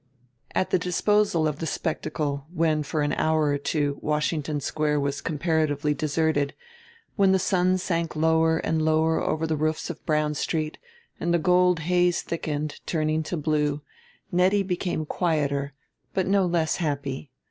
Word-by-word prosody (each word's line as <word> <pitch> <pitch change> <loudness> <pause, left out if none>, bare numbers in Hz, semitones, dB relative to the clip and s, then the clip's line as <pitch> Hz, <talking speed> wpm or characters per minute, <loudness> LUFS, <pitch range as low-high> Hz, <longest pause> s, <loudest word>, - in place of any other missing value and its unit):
At 185 0 0
the 185 - +3
disposal 180 -1 +2
of 150 -1 -3
the 160 - -3
spectacle, 150 -4 -3
when 160 -3 +1
for 150 +1 -1
an 145 - 0
hour 155 0 +2
or 145 0 0
two 145 0 -1
Washington 150 0 -1
Square 150 +1 0
was 140 0 -2
comparatively 150 -2 0
deserted, 150 -1 0 0.6
when 195 -2 +5
the - - +5
sun 185 0 +2
sank 170 -3 -2
lower 160 +1 +3
and 160 0 0
lower 160 +1 +2
over 155 +1 0
the 160 -1 0
roofs 155 +2 -1
of 160 - -12
Brown 150 -1 +1
Street 155 +1 -2 0.4
and 170 - -1
the 170 - +4
gold 180 +1 +3
haze 175 +1 +2
thickened, 155 -2 -3
turning 155 -1 0
to 165 +2 -4
blue, 150 -1 0 0.5
Nettie 190 +3 +3
became 180 -4 -2
quieter 145 -5 -1 0.4
but 190 - +1
no 195 -1 +3
less 165 -2 +1
happy. 140 -3 -3
155 Hz, 155 wpm, -25 LUFS, 150-175 Hz, 0.6 s, when